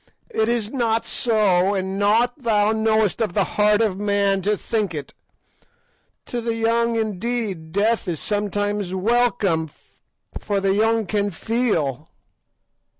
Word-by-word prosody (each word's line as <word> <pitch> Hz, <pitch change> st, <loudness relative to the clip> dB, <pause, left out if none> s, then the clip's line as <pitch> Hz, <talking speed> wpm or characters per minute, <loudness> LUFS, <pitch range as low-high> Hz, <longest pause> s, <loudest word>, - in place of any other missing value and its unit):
It 220 Hz, -, 0 dB
is 230 Hz, -2 st, -1 dB
not 230 Hz, -4 st, 0 dB
so, 200 Hz, -4 st, +2 dB
and 190 Hz, 0 st, -3 dB
naught 235 Hz, +6 st, +2 dB
thou 215 Hz, -3 st, +2 dB
knowest 220 Hz, -1 st, +1 dB
of 215 Hz, -6 st, -1 dB
the 200 Hz, -, +2 dB
heart 210 Hz, +2 st, +2 dB
of 200 Hz, -4 st, 0 dB
man 200 Hz, -1 st, +1 dB
to 205 Hz, +2 st, 0 dB
think 210 Hz, -6 st, -2 dB
it. 145 Hz, -2 st, -7 dB, 1.1 s
To 240 Hz, -, -4 dB
the 230 Hz, 0 st, -2 dB
young, 230 Hz, +1 st, +1 dB
indeed, 215 Hz, -5 st, -3 dB
death 215 Hz, +4 st, +1 dB
is 165 Hz, -4 st, -2 dB
sometimes 205 Hz, -2 st, -1 dB
welcome, 200 Hz, -6 st, +1 dB, 0.7 s
for 205 Hz, -1 st, -1 dB
the 195 Hz, 0 st, +1 dB
young 220 Hz, +2 st, +2 dB
can 205 Hz, +1 st, 0 dB
feel. 165 Hz, -, -1 dB
210 Hz, 135 wpm, -22 LUFS, 195-225 Hz, 1.1 s, so